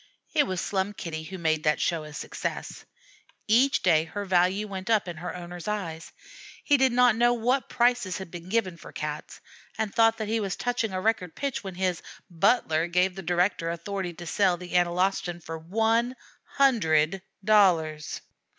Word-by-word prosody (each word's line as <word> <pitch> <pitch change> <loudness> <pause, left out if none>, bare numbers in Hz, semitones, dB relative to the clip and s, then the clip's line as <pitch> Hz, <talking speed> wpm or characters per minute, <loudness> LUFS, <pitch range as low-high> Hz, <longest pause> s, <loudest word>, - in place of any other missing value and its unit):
It 295 -2 +3
was 185 -1 -2
Slum 195 +1 -1
Kitty 160 -5 -5
who 190 +3 -7
made 160 -3 +1
that 150 - +2
show 165 -3 -1
a 150 - -10
success. 150 - -5 0.6
Each 250 +5 +3
day 160 -3 +4
her 200 +5 -5
value 185 +2 +2
went 195 0 -6
up 220 -4 +2
in 175 -2 -6
her 180 +3 -5
owner's 175 0 -8
eyes. 170 -6 -4 0.5
He 290 - +4
did 265 -2 +4
not 245 -1 +4
know 240 +1 +4
what 245 +2 0
prices 240 -6 +1
had 190 -3 -8
been 175 0 -9
given 190 -5 0
for - - -12
Cats, 150 0 -6 0.4
and 220 -2 -2
thought 225 0 +4
that 215 - -3
he 225 +1 0
was 195 -3 -2
touching 245 -3 -1
a 185 - -2
record 185 -4 -1
pitch 280 -5 -3
when 190 -2 -6
his 185 -2 -1 0.3
"butler" 170 -3 +2
gave 180 +2 +2
the 190 - -7
director 175 -1 0
authority 175 +2 -4
to 175 +1 -10
sell 185 +1 +2
the 180 0 -9
Analostan 180 0 +1
for 165 -1 -7
one 225 +8 +1 0.4
hundred 190 - +3 0.2
dollars. 170 -8 +3
185 Hz, 180 wpm, -27 LUFS, 170-220 Hz, 0.6 s, day